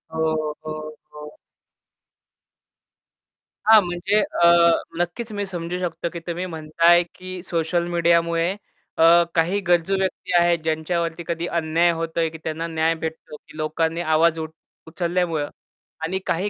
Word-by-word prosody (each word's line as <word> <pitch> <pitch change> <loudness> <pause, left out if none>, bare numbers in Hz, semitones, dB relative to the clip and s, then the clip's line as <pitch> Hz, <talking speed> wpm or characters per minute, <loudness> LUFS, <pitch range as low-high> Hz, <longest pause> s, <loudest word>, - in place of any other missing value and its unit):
हो, 160 - -1 0.5
हो, 155 - -3 0.4
हो. 150 0 -11 2.3
हां, 220 -1 +8
म्हणजे 175 +4 0 0.2
अ, - - +8 0.5
नक्कीच 215 +7 -4
मी 205 - -1
समजू 175 -1 -4
शकतो, 170 -1 -3
की 170 - -5
तुम्ही 175 +2 -3
म्हणता 160 -1 -3
आहे, 175 0 +7
की 185 -1 -8
सोशल 170 0 -1
मीडियामुळे 170 0 +2 0.5
अ, 160 - +4 0.3
काही 175 +5 +2
गरजू 175 +2 +2
व्यक्ती 190 -1 -3
आहेत 170 -1 +3
ज्यांच्यावरती 165 +1 -2
कधी 170 0 -2
अन्याय 165 +2 +2
होतो 165 0 -3
आहे, 165 -1 +1
की 160 - -10
त्यांना 160 +1 -3
न्याय 160 0 +1
भेटतो, 160 -1 -7
की 155 - -16
लोकांनी 160 +2 -1
आवाज 160 0 +2
उट 160 0 -5 0.4
उचलल्यामुळं 170 -3 -1 0.5
आणि 190 +4 -1
काही 190 +5 -1
170 Hz, 140 wpm, -22 LUFS, 160-175 Hz, 2.3 s, हां